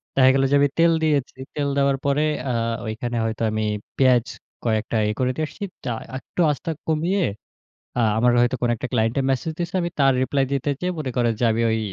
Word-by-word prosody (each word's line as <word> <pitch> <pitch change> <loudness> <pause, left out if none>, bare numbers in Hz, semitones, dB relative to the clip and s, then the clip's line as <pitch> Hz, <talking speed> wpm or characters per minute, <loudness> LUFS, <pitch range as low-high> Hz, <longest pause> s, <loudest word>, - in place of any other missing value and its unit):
দেখা 130 -1 +6
গেল 135 0 +2
যে, - - +5
আমি 145 - +4
তেল 165 0 +5
দিয়েছি। 145 -4 +1 0.2
তেল 145 -1 0
দেওয়ার 140 -1 +3
পরে 140 +2 +2 0.3
আ - - +1 0.3
ওইখানে 120 +2 -4
হয়তো 110 0 -3
আমি 110 0 -1 0.3
পেঁয়াজ 125 -3 +4 0.4
কয়েকটা 110 0 0
ইয়ে 105 - 0
করে 130 0 +2
দিয়ে 155 - -1
আসছি। 205 - -9 0.2
তা - - -2 0.3
একটু 130 - -11
আঁচটা 150 +3 -3 0.2
কমিয়ে 170 +5 +1 0.8
আ - - +3 0.2
আমার 120 +2 +4
হয়তো 120 +2 +2
কোনো 120 -1 +2
একটা 125 - -5
ক্লায়েন্টের 120 +3 +1
মেসেজ 135 +5 -1
দিয়েছে, 175 +1 -3
আমি 170 - -2
তার 135 -1 +5
রিপ্লাই 135 +1 +1
দিতে 140 +1 0
যেয়ে 180 0 -1
মনে 135 -4 -3
করেন 120 -2 +2
যে, - - +2
আমি 115 +1 0
ওই 110 - +1
135 Hz, 205 wpm, -23 LUFS, 120-150 Hz, 0.8 s, দেখা